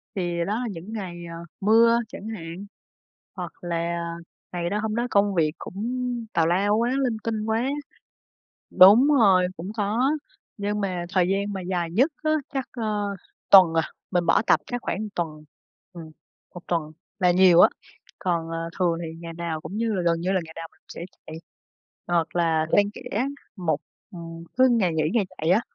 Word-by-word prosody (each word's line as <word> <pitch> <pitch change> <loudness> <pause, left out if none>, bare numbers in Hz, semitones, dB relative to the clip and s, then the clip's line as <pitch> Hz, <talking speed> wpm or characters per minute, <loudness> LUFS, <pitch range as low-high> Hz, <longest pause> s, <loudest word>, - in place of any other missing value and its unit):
Thì 175 -2 -2
đó 215 +4 -1
là 245 - -2
những 185 +5 -8
ngày, 185 -5 -5
ờ, - - -7 0.3
mưa 230 +3 +5
chẳng 210 - -8
hạn 180 -1 -7 0.7
hoặc 175 -2 -5
là 170 0 -2 0.5
ngày 175 0 -2
đó, 210 - 0
hôm 220 -1 -2
đó 240 +1 0
công 200 -1 +3
việc 155 -3 +2
cũng 200 +4 -6 0.5
tào 165 -1 +2
lao 200 +4 +2
quá, 235 +2 +1
linh 235 -3 0
tinh 220 -2 -2
quá. 225 +3 0 1.0
Đúng 210 +9 +8
rồi, 200 -11 +5
cũng 185 +6 -6
có. 225 +7 +1 0.5
Nhưng 205 +1 -2
mà 180 -3 -2
thời 180 -1 +2
gian 200 +1 -1
mà 190 - -4
dài 175 -2 -2
nhất 260 - +3
á, 310 - +2 0.2
chắc, 265 -3 -2
ờ, 210 -4 -2 0.4
tuần, 185 -4 +9
à, 165 - +3 0.3
mình 175 -1 +1
bỏ - - +4
tập - - +5
chắc 245 -1 -3
khoảng 210 +1 -3
tuần. 155 -3 -4 0.5
Ừm, 160 -2 -10 0.4
1 180 - -7
tuần 165 -3 -1 0.3
là 180 -2 +4
nhiều 180 -1 +6
á. - - +8 0.5
Còn, 170 -3 -1
ờ, 165 0 -4
thường 170 -2 +2
thì 160 0 -6
ngày 170 -1 -8
nào 165 -2 -4
cũng 205 - -6
như 225 -1 0
gần 170 0 +2
như 185 +2 0
là 190 - +1
ngày 160 - -12
nào 165 0 -6
mình - - -29
cũng - - -79
sẽ 170 - -7 0.2
chạy 160 - -7 0.7
hoặc 170 -1 0
là 165 -2 +2
xen 205 0 +4
kẽ 230 +5 -3 0.3
một 160 -6 -1 0.3
ừm, 165 -1 -9
cứ 260 0 +6
ngày 190 -8 +2
nghỉ, 155 - +1
ngày 225 -4 +2
chạy 160 +2 -1
á. 205 +6 +4
185 Hz, 190 wpm, -25 LUFS, 170-210 Hz, 1.0 s, tuần